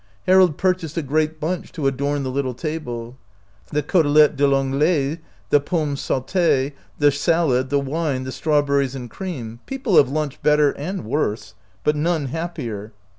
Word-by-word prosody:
Harold 185 -4 +5
purchased 180 -4 0
a 165 - 0
great 155 +3 0
bunch 170 +4 -3
to 150 - -4
adorn 140 +1 0
the 130 - -3
little 130 -2 -2
table. 125 -5 -5 0.5
The 150 0 0
cotelette 150 -2 +4
a - - -16
P 145 - -2
An 135 -1 +2
glais, 150 +1 +1 0.3
the 145 - +5
potnmes 150 -3 -1
saute, 145 -1 +1 0.2
the 145 -1 +4
salad, 140 -3 +1
the 140 +1 +2
wine, 140 -1 -2
the 130 - -5
strawberries 140 -3 +1
and 125 -3 -7
cream 125 - -6
— - - -38
people 265 -8 0
have 130 - +6
lunched 150 -1 -3
better 150 -1 +4
and 175 - -5
worse, 110 -5 -2 0.3
but 150 - +2
none 155 -2 0
happier. 125 -10 -5
145 Hz, 170 wpm, -21 LUFS, 135-160 Hz, 0.5 s, have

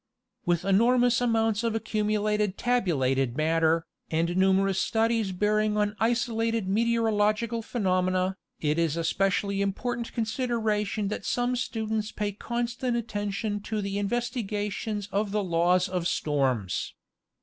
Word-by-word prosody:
With 175 -1 +2
the - - -2
enormous 240 +4 +4
amounts 225 -2 +1
of 230 -1 0
accumulated 210 -2 0
tabulated 135 - +1
matter, 160 +1 +2 0.2
and 165 +2 0
numerous 190 0 +3
studies 225 -2 +1
bearing 210 +2 +1
on 210 0 +1
isolated 230 -2 0
meteorological 225 +1 +1
phe 225 - -16
nomena, 185 -2 +1 0.2
it 150 +1 0
is 165 -1 +1
a 165 - -1
specially 195 +3 +1
important 235 +4 -2
consideration 220 -3 -1
that 210 - -4
some 245 +1 0
students 220 -3 -2
pay 210 -1 -2
constant 240 +3 -2
attention 205 -2 -2
to 215 +1 -3
the 200 0 -2
investigations 210 -2 -2
of 205 +1 0
the 210 +1 0
laws 180 +1 +2
of 180 -2 -1
storms. 130 - -1
210 Hz, 125 wpm, -27 LUFS, 185-225 Hz, 0.2 s, enormous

